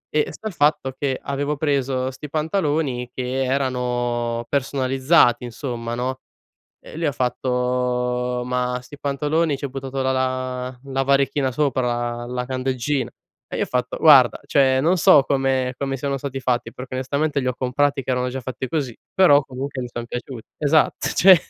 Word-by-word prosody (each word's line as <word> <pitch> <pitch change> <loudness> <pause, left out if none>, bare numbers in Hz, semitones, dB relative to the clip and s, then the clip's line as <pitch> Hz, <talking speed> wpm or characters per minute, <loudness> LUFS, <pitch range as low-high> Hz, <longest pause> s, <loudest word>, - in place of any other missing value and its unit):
E 150 - +3
sta 220 - -7
il 215 - -5
fatto 145 -4 +2
che, 135 -2 -1
avevo 145 +1 -2
preso 135 -3 0
sti 145 +3 -9
pantaloni 150 -6 -1
che 130 +1 -2
erano 120 -3 -1
personalizzati 135 -1 +2
insomma 120 -1 -5
no? 130 +2 -2 0.6
Eh - - -14
e - - -8
lui 165 - -1
ha 145 - +2
fatto: 125 0 -1
"Ma 125 0 -1
sti 145 +3 -12
pantaloni, 145 +2 0
ci - - -14
hai - - -4
buttato 135 0 -4
la 130 0 +1
la 130 -1 -2
la 135 0 -1
varechina 140 0 +2
sopra, 120 -3 -1
la 125 0 -3
candeggina?" 130 0 -1 0.4
E - - -5
gli - - -1
ho - - +2
fatto: 125 -1 -2
"Guarda, 135 -6 +6
cioè 130 -2 +3
non 170 +6 +3
so 180 -4 +7
come 135 -2 0
come 135 -1 -2
siano 140 +1 -2
stati 135 0 -5
fatti, 125 -1 -1
perché 130 0 -7
onestamente 140 +3 0
li 130 - -3
ho 125 - +1
comprati 140 +3 0
che - - -7
erano 125 0 0
già 130 +1 -5
fatti 130 +1 -5
così, 135 -5 -3 0.2
però 175 -7 +6
comunque 135 0 -5
mi - - -5
sono 120 0 -5
piaciuti." 120 -1 -6
Esatt 150 +1 +2
cioè 190 0 +8
130 Hz, 175 wpm, -22 LUFS, 125-140 Hz, 0.6 s, cioè